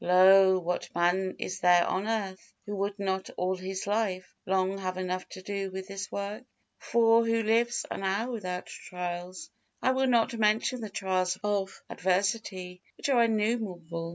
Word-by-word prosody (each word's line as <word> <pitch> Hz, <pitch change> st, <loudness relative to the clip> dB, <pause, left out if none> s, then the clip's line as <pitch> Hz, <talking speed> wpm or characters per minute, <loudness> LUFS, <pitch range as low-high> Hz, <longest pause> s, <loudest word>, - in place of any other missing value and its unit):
Lo! 190 Hz, +1 st, +7 dB
what 180 Hz, 0 st, -2 dB
man 180 Hz, +2 st, +1 dB
is 185 Hz, -, -4 dB
there 175 Hz, -1 st, +5 dB
on 190 Hz, +3 st, -1 dB
earth, 200 Hz, -4 st, -3 dB
who 205 Hz, -, -4 dB
would 200 Hz, +1 st, -2 dB
not 190 Hz, -1 st, -2 dB
all 185 Hz, +1 st, 0 dB
his 190 Hz, +1 st, -5 dB
life 200 Hz, -3 st, -1 dB
long 190 Hz, +1 st, +1 dB
have 185 Hz, -1 st, -3 dB
enough 185 Hz, 0 st, -3 dB
to -, -, -9 dB
do 200 Hz, 0 st, -3 dB
with 190 Hz, 0 st, -6 dB
this 195 Hz, 0 st, -6 dB
work? 205 Hz, +4 st, -4 dB, 0.4 s
For 230 Hz, 0 st, +4 dB
who 230 Hz, 0 st, +1 dB
lives 230 Hz, +2 st, +2 dB
an -, -, -4 dB
hour 200 Hz, +6 st, -1 dB
without 180 Hz, -6 st, -4 dB
trials? 180 Hz, 0 st, -6 dB, 0.3 s
I 260 Hz, -, +2 dB
will 265 Hz, 0 st, +1 dB
not 240 Hz, 0 st, +3 dB
mention 225 Hz, +3 st, +1 dB
the 215 Hz, -, -5 dB
trials 190 Hz, -3 st, 0 dB
of 200 Hz, -2 st, -2 dB
adversity, 185 Hz, -1 st, -1 dB, 0.2 s
which -, -, -3 dB
are 245 Hz, -4 st, +5 dB
innumerable. 205 Hz, -7 st, -1 dB
195 Hz, 165 wpm, -29 LUFS, 185-220 Hz, 0.4 s, Lo